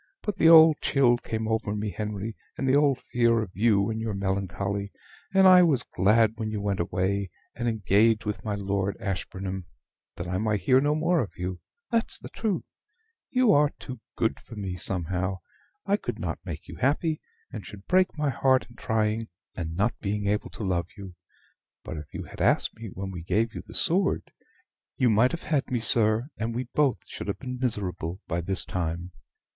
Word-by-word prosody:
But 205 -3 -3
the 160 - +6
old 160 -2 +9
chill 125 -4 +3
came 110 -1 -3
over 110 -2 -1
me, 105 0 -2
Henry, 105 +1 -4 0.2
and 135 - -1
the 130 - +4
old 145 -3 +4
fear 115 -1 +2
of 95 - -9
you 105 0 +2
and 110 0 -3
your 110 -3 -2
melancholy; 100 +1 -2 0.4
and 190 0 +6
I 185 -1 +9
was 145 -8 +3
glad 110 +4 +2
when 110 -2 -3
you 110 -1 -3
went 100 -1 -1
away, 95 +3 -1 0.2
and 120 0 -3
engaged 110 0 +3
with 105 -1 -3
my 105 -2 -2
Lord 100 -1 -1
Ashburnham, 95 -1 -4 0.5
that 85 - -5
I 90 +1 -1
might 105 -2 0
hear 130 +7 +4
no 145 +1 +2
more 165 +1 +2
of 105 - -6
you, 90 0 -4 0.3
that's 230 -1 +1
the - - -9
truth. 215 -5 -2 0.7
You 250 -4 +4
are 145 0 +5
too 130 -3 -8 0.2
good 115 - 0
for 115 - -12
me, 95 -3 -4
somehow. 90 +1 0 0.5
I - - +2
could - - -5
not - - -4
make - - -7
you - - -9
happy, 155 +4 +1 0.3
and 110 - -6
should 100 +2 -11
break 185 -1 +2
my 150 -2 +1
heart 130 -1 +2
in - - -17
trying, 110 0 0 0.3
and 80 -2 -5
not 105 +6 +1
being 105 0 -2
able 105 +1 0
to 110 - -7
love 90 -3 0
you. 95 -2 -9 0.7
But 80 - -6
if 75 -1 -9
you - - -5
had - - -9
asked - - +3
me 115 0 -8
when 95 +1 -5
we 90 -2 -6
gave 110 +7 0
you - - -6
the - - -8
sword, 190 +1 +1 0.7
you 125 -3 +3
might 115 +4 +4
have 170 - -5
had 150 -4 0
me, 125 - 0
sir, 110 +2 +3
and 115 +1 -3
we 125 - -1
both 145 -4 +3
should - - -7
have 100 - -2
been 125 -2 -6
miserable 95 -7 -2
by 85 0 -1
this 95 +2 -3
time. 85 0 -3
110 Hz, 195 wpm, -27 LUFS, 95-130 Hz, 0.7 s, old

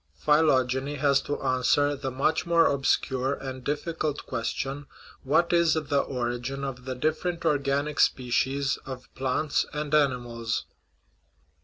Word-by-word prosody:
Phy 150 0 +3
logeny 130 -1 +1
has 140 -1 +3
to 145 - -3
answer 145 +3 +2
the 135 -1 -4
much 145 +6 0
more 170 -1 +5
obscure 135 -1 +1
and 130 -2 -7
difficult 150 +1 -2
question: 135 +3 -3 0.2
* - - -21
What 170 +3 +3
is 170 -2 +4
the 145 -2 0
origin 125 +2 -3
of 125 -2 -5
the 130 -1 -3
different 165 +5 -1
organic 145 0 0
species 135 +2 +1
of 130 -2 -9
plants 135 +3 0
and 150 0 -4
animals?" 120 -6 0
140 Hz, 135 wpm, -27 LUFS, 130-150 Hz, 0.2 s, more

